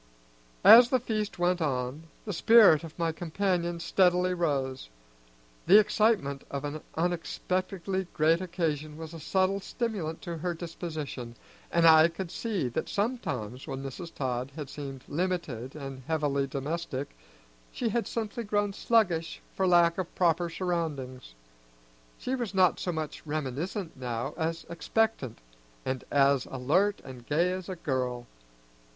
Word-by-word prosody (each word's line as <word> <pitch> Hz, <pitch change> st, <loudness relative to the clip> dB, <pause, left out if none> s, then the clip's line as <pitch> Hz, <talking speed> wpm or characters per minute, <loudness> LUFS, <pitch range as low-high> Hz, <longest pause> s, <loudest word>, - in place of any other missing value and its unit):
As 240 Hz, +1 st, +10 dB
the 255 Hz, -, +3 dB
feast 215 Hz, -3 st, -3 dB
went 175 Hz, 0 st, +1 dB
on, 135 Hz, +1 st, -2 dB, 0.2 s
the 205 Hz, -, -3 dB
spirits 195 Hz, -5 st, +6 dB
of 165 Hz, -2 st, -10 dB
my 165 Hz, -1 st, 0 dB
companion 175 Hz, +1 st, -1 dB
steadily 180 Hz, +1 st, +3 dB
rose. 135 Hz, -, -1 dB, 0.8 s
The 195 Hz, +4 st, +9 dB
excitement 210 Hz, -10 st, +2 dB
of 140 Hz, +1 st, -4 dB
an 145 Hz, +1 st, -4 dB
unexpectedly 185 Hz, +2 st, -2 dB
great 160 Hz, +3 st, +3 dB
occasion 155 Hz, -4 st, -2 dB
was 160 Hz, 0 st, -8 dB
a 165 Hz, -, -8 dB
subtle 190 Hz, +5 st, +1 dB
stimulant 200 Hz, -8 st, -3 dB
to 170 Hz, -3 st, -5 dB
her 175 Hz, +1 st, -2 dB
disposition, 155 Hz, -8 st, -6 dB, 0.4 s
and 170 Hz, 0 st, +3 dB
I 160 Hz, 0 st, +8 dB
could 170 Hz, +1 st, -6 dB
see 205 Hz, -, -2 dB
that 120 Hz, -, -3 dB
sometimes 140 Hz, -, -3 dB
when 135 Hz, 0 st, -5 dB
Mrs. 165 Hz, +6 st, -7 dB
Todd 130 Hz, -1 st, -2 dB
had 145 Hz, -4 st, -6 dB
seemed 135 Hz, -3 st, -7 dB
limited 155 Hz, -8 st, -3 dB
and 135 Hz, -3 st, -7 dB
heavily 145 Hz, -4 st, 0 dB
domestic, 140 Hz, 0 st, -4 dB, 0.6 s
she 240 Hz, -, -1 dB
had 235 Hz, +2 st, -1 dB
simply 230 Hz, +1 st, -3 dB
grown 205 Hz, -1 st, 0 dB
sluggish 185 Hz, -8 st, +1 dB, 0.2 s
for 190 Hz, -, +1 dB
lack 170 Hz, 0 st, +4 dB
of 180 Hz, -1 st, -4 dB
proper 170 Hz, -1 st, +2 dB
surroundings. 150 Hz, -, -3 dB, 0.8 s
She 255 Hz, -, -3 dB
was 240 Hz, -6 st, -3 dB
not 185 Hz, -1 st, +4 dB
so 180 Hz, -, -2 dB
much 160 Hz, -2 st, -5 dB
reminiscent 155 Hz, -, -3 dB
now 125 Hz, +1 st, -4 dB
as 165 Hz, 0 st, -2 dB
expectant, 170 Hz, -, -1 dB, 0.5 s
and 130 Hz, -1 st, -2 dB
as 140 Hz, -1 st, +3 dB
alert 170 Hz, +11 st, +1 dB
and 130 Hz, -2 st, -10 dB
gay 170 Hz, +5 st, +2 dB
as 185 Hz, 0 st, -5 dB
a 185 Hz, -, -3 dB
girl. 125 Hz, -7 st, -2 dB
165 Hz, 140 wpm, -29 LUFS, 140-185 Hz, 0.8 s, As